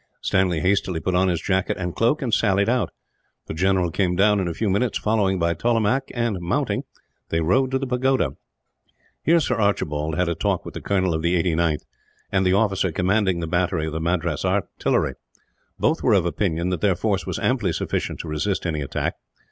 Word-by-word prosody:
Stanley 90 Hz, -4 st, +1 dB
hastily 95 Hz, -2 st, +1 dB
put 90 Hz, +4 st, -2 dB
on 90 Hz, +1 st, +3 dB
his 85 Hz, -3 st, 0 dB
jacket 95 Hz, +1 st, 0 dB
and 90 Hz, -1 st, -4 dB
cloak, 120 Hz, +6 st, +1 dB
and 120 Hz, -4 st, -2 dB
sallied 100 Hz, -2 st, +2 dB
out. 125 Hz, +1 st, +1 dB, 0.6 s
The -, -, -6 dB
general 90 Hz, +1 st, +1 dB
came 90 Hz, 0 st, 0 dB
down 105 Hz, +2 st, +4 dB
in 95 Hz, -, -1 dB
a 85 Hz, -, -2 dB
few 110 Hz, -, -1 dB
minutes, 100 Hz, +5 st, +1 dB
followed 100 Hz, -4 st, +1 dB
by 85 Hz, 0 st, +1 dB
Tollemache 120 Hz, +6 st, +1 dB
and, 120 Hz, -5 st, -1 dB
mounting, 85 Hz, 0 st, -1 dB, 0.4 s
they 80 Hz, -, 0 dB
rode 125 Hz, +12 st, +2 dB
to 135 Hz, -, +1 dB
the 135 Hz, -, -3 dB
pagoda. 125 Hz, -, +1 dB, 0.9 s
Here 170 Hz, +1 st, +4 dB
Sir 125 Hz, -6 st, 0 dB
Archibald 80 Hz, -7 st, 0 dB
had 90 Hz, +1 st, +1 dB
a 85 Hz, -, +1 dB
talk 80 Hz, -, -1 dB
with -, -, -8 dB
the -, -, -6 dB
colonel 95 Hz, -3 st, +1 dB
of 80 Hz, -, -1 dB
the 85 Hz, +2 st, +1 dB
89th, 85 Hz, -2 st, +1 dB, 0.5 s
and 95 Hz, -1 st, +2 dB
the 90 Hz, -, +3 dB
officer 100 Hz, -3 st, +1 dB
commanding 95 Hz, +1 st, +1 dB
the -, -, -2 dB
battery 85 Hz, -1 st, 0 dB
of 80 Hz, -, -4 dB
the 80 Hz, -, -3 dB
Madras 85 Hz, -2 st, -1 dB
Artillery. -, -, 0 dB, 0.6 s
Both 160 Hz, +2 st, +1 dB
were 120 Hz, -, +3 dB
of 95 Hz, -4 st, +3 dB
opinion 85 Hz, -1 st, -1 dB
that 90 Hz, -3 st, -2 dB
their 100 Hz, -3 st, +3 dB
force 100 Hz, -2 st, -1 dB
was -, -, -2 dB
amply 115 Hz, -8 st, +1 dB
sufficient -, -, -2 dB
to -, -, -9 dB
resist 85 Hz, +6 st, -2 dB
any 80 Hz, -3 st, -1 dB
attack. 70 Hz, -, -2 dB
95 Hz, 200 wpm, -23 LUFS, 85-105 Hz, 0.9 s, down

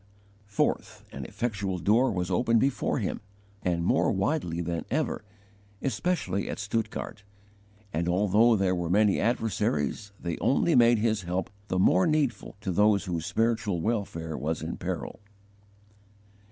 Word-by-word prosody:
4. 105 Hz, -, +1 dB, 0.3 s
An -, -, -6 dB
effectual 100 Hz, -5 st, -2 dB
door 110 Hz, +10 st, +3 dB
was 90 Hz, -3 st, -2 dB
opened 115 Hz, -2 st, +3 dB
before 135 Hz, +3 st, 0 dB
him, -, -, -2 dB, 0.4 s
and 85 Hz, -3 st, 0 dB
more -, -, +3 dB
widely 85 Hz, -1 st, -1 dB
than 85 Hz, -1 st, -2 dB
ever, -, -, -1 dB, 0.6 s
especially 135 Hz, -, -1 dB
at -, -, -4 dB
Stuttgart; 105 Hz, 0 st, -3 dB, 0.7 s
and 85 Hz, +2 st, 0 dB
although 105 Hz, +5 st, +4 dB
there 95 Hz, -2 st, +1 dB
were 85 Hz, -2 st, -2 dB
many 105 Hz, +2 st, +3 dB
adversaries, 105 Hz, -, -1 dB
they 85 Hz, -2 st, -4 dB
only 150 Hz, +5 st, +2 dB
made 120 Hz, -2 st, +6 dB
his 110 Hz, -1 st, +1 dB
help 90 Hz, 0 st, -3 dB, 0.2 s
the 95 Hz, -, -1 dB
more 90 Hz, 0 st, +4 dB
needful 150 Hz, -6 st, 0 dB
to 100 Hz, -3 st, -2 dB
those 105 Hz, +2 st, +3 dB
whose 85 Hz, -3 st, -3 dB
spiritual 110 Hz, -5 st, 0 dB
welfare 85 Hz, -6 st, -2 dB
was 80 Hz, +1 st, -2 dB
in -, -, -4 dB
peril. -, -, -5 dB
100 Hz, 140 wpm, -28 LUFS, 90-115 Hz, 0.7 s, made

